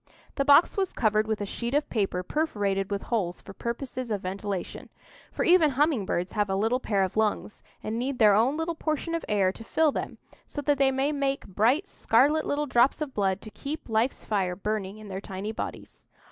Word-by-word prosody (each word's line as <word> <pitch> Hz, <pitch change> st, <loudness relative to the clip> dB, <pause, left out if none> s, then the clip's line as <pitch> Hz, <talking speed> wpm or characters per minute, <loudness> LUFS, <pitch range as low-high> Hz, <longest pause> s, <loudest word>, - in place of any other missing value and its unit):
The 275 Hz, -, 0 dB
box 290 Hz, +7 st, +6 dB
was 385 Hz, -2 st, 0 dB
covered 215 Hz, -2 st, +2 dB
with 215 Hz, -2 st, -1 dB
a -, -, -1 dB
sheet 235 Hz, +6 st, -3 dB
of 295 Hz, -, +1 dB
paper 195 Hz, -5 st, -1 dB
perforated 200 Hz, -, -1 dB
with 200 Hz, -1 st, -3 dB
holes 185 Hz, -7 st, -1 dB
for 195 Hz, -, -11 dB
purposes 245 Hz, +2 st, -4 dB
of 205 Hz, -3 st, -1 dB
ventilation; 195 Hz, 0 st, -4 dB, 0.4 s
for -, -, -2 dB
even 345 Hz, -3 st, +6 dB
humming 275 Hz, -, +1 dB
birds 180 Hz, +2 st, -1 dB
have 210 Hz, -2 st, 0 dB
a 190 Hz, -, 0 dB
little 225 Hz, +6 st, +1 dB
pair 200 Hz, -6 st, +1 dB
of 190 Hz, -, -3 dB
lungs, 215 Hz, -1 st, -1 dB, 0.2 s
and 220 Hz, +2 st, -3 dB
need 260 Hz, +1 st, -2 dB
their 215 Hz, -3 st, +6 dB
own 240 Hz, +8 st, +3 dB
little 325 Hz, +1 st, -1 dB
portion 315 Hz, +1 st, -2 dB
of 335 Hz, -, -2 dB
air 195 Hz, -3 st, +3 dB
to 225 Hz, -, -11 dB
fill 310 Hz, +6 st, +2 dB
them, -, -, -4 dB, 0.3 s
so -, -, -6 dB
that 285 Hz, 0 st, +1 dB
they 270 Hz, -1 st, +5 dB
may 270 Hz, +2 st, 0 dB
make 275 Hz, -1 st, -1 dB
bright 240 Hz, -, +1 dB
scarlet 290 Hz, -, +2 dB
little 295 Hz, +1 st, 0 dB
drops 255 Hz, -1 st, +3 dB
of 300 Hz, -4 st, -4 dB
blood 195 Hz, -1 st, 0 dB
to 215 Hz, -, -9 dB
keep 295 Hz, +8 st, -6 dB
life's 225 Hz, +3 st, 0 dB
fire 190 Hz, -4 st, 0 dB
burning 205 Hz, 0 st, -3 dB
in 215 Hz, -1 st, -11 dB
their 190 Hz, 0 st, -5 dB
tiny 200 Hz, +2 st, -5 dB
bodies. 220 Hz, -, -7 dB
225 Hz, 210 wpm, -27 LUFS, 200-280 Hz, 0.4 s, box